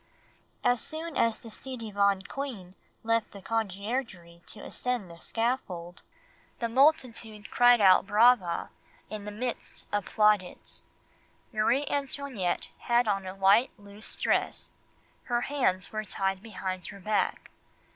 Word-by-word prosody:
"As 245 Hz, -1 st, +3 dB
soon 320 Hz, 0 st, -3 dB
as 230 Hz, -1 st, +2 dB
the 230 Hz, -, -10 dB
ci 260 Hz, +4 st, -2 dB
devant 200 Hz, -3 st, +1 dB
queen 235 Hz, -11 st, -6 dB, 0.3 s
left 230 Hz, 0 st, +1 dB
the 200 Hz, -, -9 dB
Conciergerie 200 Hz, -4 st, -3 dB
to 215 Hz, -, -4 dB
ascend 245 Hz, -8 st, -2 dB
the 170 Hz, -, -13 dB
scaffold, 200 Hz, -8 st, -2 dB, 0.6 s
the 235 Hz, -, -1 dB
multitude 230 Hz, -5 st, +1 dB
cried 245 Hz, -1 st, +6 dB
out 195 Hz, -1 st, +6 dB
brava 215 Hz, -4 st, +4 dB, 0.4 s
in 210 Hz, -1 st, -6 dB
the 210 Hz, -, -5 dB
midst 240 Hz, +3 st, -5 dB
of 205 Hz, -1 st, 0 dB
plaudits. 210 Hz, -4 st, +1 dB, 0.7 s
Marie 235 Hz, +6 st, +2 dB
Antoinette 275 Hz, -10 st, -2 dB
had 240 Hz, -1 st, +2 dB
on 195 Hz, -2 st, 0 dB
a 185 Hz, -, -6 dB
white 195 Hz, +6 st, +5 dB
loose 205 Hz, +1 st, -12 dB
dress, -, -, -1 dB, 0.5 s
her 240 Hz, -1 st, 0 dB
hands 245 Hz, -10 st, 0 dB
were 215 Hz, 0 st, -3 dB
tied 195 Hz, -2 st, -2 dB
behind 185 Hz, -4 st, -5 dB
her 200 Hz, -, -9 dB
back. 210 Hz, +2 st, -1 dB
215 Hz, 130 wpm, -29 LUFS, 195-245 Hz, 0.7 s, cried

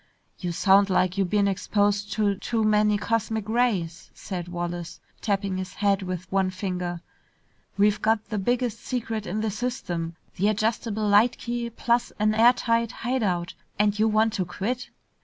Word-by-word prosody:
"You 180 Hz, -2 st, -3 dB
sound 195 Hz, +3 st, +4 dB
like 185 Hz, -1 st, +2 dB
you 195 Hz, -, +3 dB
been 200 Hz, +2 st, +2 dB
exposed 205 Hz, +1 st, 0 dB
to 210 Hz, -2 st, +2 dB
too 220 Hz, +3 st, -2 dB
many 210 Hz, -1 st, +3 dB
cosmic 220 Hz, -1 st, -1 dB
rays!" 215 Hz, -8 st, 0 dB
said 180 Hz, -3 st, -5 dB
Wallace, 175 Hz, -1 st, -5 dB, 0.2 s
tapping 200 Hz, -3 st, -1 dB
his 185 Hz, 0 st, -5 dB
head 200 Hz, -1 st, +2 dB
with 185 Hz, -1 st, -4 dB
one 190 Hz, -1 st, +2 dB
finger. 180 Hz, -2 st, -4 dB, 0.8 s
"We've 205 Hz, +1 st, +3 dB
got 220 Hz, 0 st, +1 dB
the 215 Hz, -2 st, -2 dB
biggest 240 Hz, +2 st, 0 dB
secret 225 Hz, -4 st, -3 dB
in 210 Hz, +4 st, -2 dB
the 220 Hz, -1 st, -1 dB
system, 185 Hz, -8 st, -3 dB, 0.2 s
the 200 Hz, -, +2 dB
adjustable 215 Hz, 0 st, 0 dB
light 205 Hz, +4 st, +4 dB
key 240 Hz, 0 st, -3 dB
plus 235 Hz, +1 st, 0 dB
an 215 Hz, +1 st, +2 dB
airtight 230 Hz, 0 st, +3 dB
hide 250 Hz, +2 st, -2 dB
out, 175 Hz, -4 st, -1 dB, 0.2 s
and 210 Hz, 0 st, +2 dB
you 220 Hz, -, +4 dB
want 220 Hz, 0 st, +2 dB
to 185 Hz, -, -1 dB
quit!" 230 Hz, +8 st, -3 dB
205 Hz, 160 wpm, -25 LUFS, 185-225 Hz, 0.8 s, sound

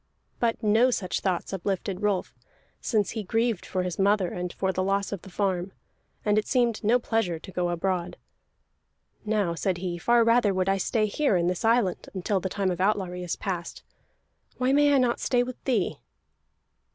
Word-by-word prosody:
But 235 Hz, 0 st, 0 dB
no 220 Hz, +4 st, +4 dB
such 185 Hz, -7 st, -1 dB
thoughts 185 Hz, 0 st, -2 dB
uplifted 195 Hz, +1 st, -2 dB
Rolf, 205 Hz, -3 st, 0 dB, 0.5 s
since 215 Hz, -4 st, 0 dB
he 225 Hz, -, -3 dB
grieved 225 Hz, 0 st, -1 dB
for 185 Hz, -1 st, -1 dB
his 180 Hz, 0 st, -4 dB
mother 195 Hz, -2 st, +3 dB
and 180 Hz, 0 st, -4 dB
for 190 Hz, +1 st, -1 dB
the 185 Hz, -, -1 dB
loss 195 Hz, +1 st, 0 dB
of 200 Hz, -4 st, -4 dB
the -, -, -12 dB
farm, 190 Hz, -1 st, -1 dB, 0.5 s
and 210 Hz, 0 st, +3 dB
it 215 Hz, -, -5 dB
seemed 240 Hz, -4 st, +1 dB
no 225 Hz, +4 st, +4 dB
pleasure 225 Hz, -8 st, -1 dB
to 175 Hz, -, -11 dB
go 180 Hz, -1 st, -1 dB
abroad. 175 Hz, 0 st, -2 dB, 1.1 s
"Now," 210 Hz, -5 st, +1 dB
said 180 Hz, +2 st, -1 dB
he, 175 Hz, -1 st, -4 dB
"far 235 Hz, +4 st, +4 dB
rather 230 Hz, -4 st, +3 dB
would 185 Hz, 0 st, 0 dB
I 195 Hz, -, +2 dB
stay 215 Hz, +3 st, +1 dB
here 215 Hz, +2 st, +1 dB
in 170 Hz, -, +1 dB
this 180 Hz, 0 st, -1 dB
island, 225 Hz, -5 st, +1 dB
until 190 Hz, +2 st, 0 dB
the 190 Hz, -, -3 dB
time 195 Hz, -1 st, 0 dB
of 180 Hz, 0 st, -3 dB
outlawry 190 Hz, -3 st, 0 dB
is 175 Hz, -1 st, -3 dB
past. 175 Hz, -3 st, -5 dB, 0.7 s
Why 255 Hz, +1 st, +1 dB
may 290 Hz, 0 st, +5 dB
I 280 Hz, -, +5 dB
not 250 Hz, -2 st, +2 dB
stay 245 Hz, -1 st, +2 dB
with 250 Hz, 0 st, -8 dB
thee?" 235 Hz, -8 st, 0 dB
195 Hz, 190 wpm, -26 LUFS, 180-225 Hz, 1.1 s, may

